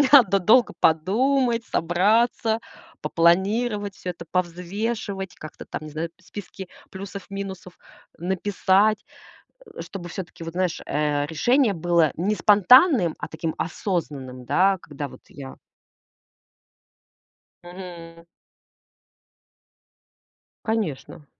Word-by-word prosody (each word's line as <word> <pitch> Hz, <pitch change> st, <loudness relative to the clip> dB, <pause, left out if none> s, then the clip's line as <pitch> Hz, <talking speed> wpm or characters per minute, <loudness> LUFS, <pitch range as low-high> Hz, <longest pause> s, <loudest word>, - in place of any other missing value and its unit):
Мне 280 Hz, -, +4 dB
надо 210 Hz, -9 st, +7 dB
долго 225 Hz, +6 st, +4 dB
подумать, 235 Hz, -, +2 dB
собраться, 220 Hz, +6 st, +2 dB, 0.4 s
попланировать 200 Hz, +5 st, +2 dB
всё 180 Hz, -, -5 dB
это, 170 Hz, -1 st, -8 dB
повзвешивать, 190 Hz, +3 st, -3 dB
как-то 155 Hz, -, -10 dB
там, -, -, -6 dB
не 155 Hz, -, -8 dB
знаю, 160 Hz, +3 st, -3 dB
списки 190 Hz, 0 st, -9 dB, 0.2 s
плюсов-минусов 195 Hz, -1 st, -7 dB, 0.4 s
написать. 190 Hz, +3 st, +1 dB, 0.7 s
Э, -, -, -8 dB
чтобы 175 Hz, -3 st, -7 dB
всё-таки 180 Hz, -2 st, -7 dB
вот 165 Hz, -, -6 dB
знаешь, 180 Hz, -1 st, -1 dB
э, 145 Hz, -1 st, 0 dB
решение 235 Hz, -, +2 dB
было 170 Hz, -2 st, +2 dB
не 195 Hz, +6 st, 0 dB
спонтанным, 210 Hz, -, +5 dB
а -, -, -4 dB
таким 160 Hz, 0 st, -4 dB
осознанным, 140 Hz, -9 st, -3 dB
да, 190 Hz, +7 st, +3 dB
когда 145 Hz, -1 st, -6 dB
вот 130 Hz, -, -14 dB
я 135 Hz, -2 st, -10 dB, 2.1 s
Мгм. 170 Hz, -2 st, -10 dB, 2.4 s
Конечно. 190 Hz, -9 st, -3 dB
185 Hz, 100 wpm, -24 LUFS, 165-210 Hz, 2.4 s, надо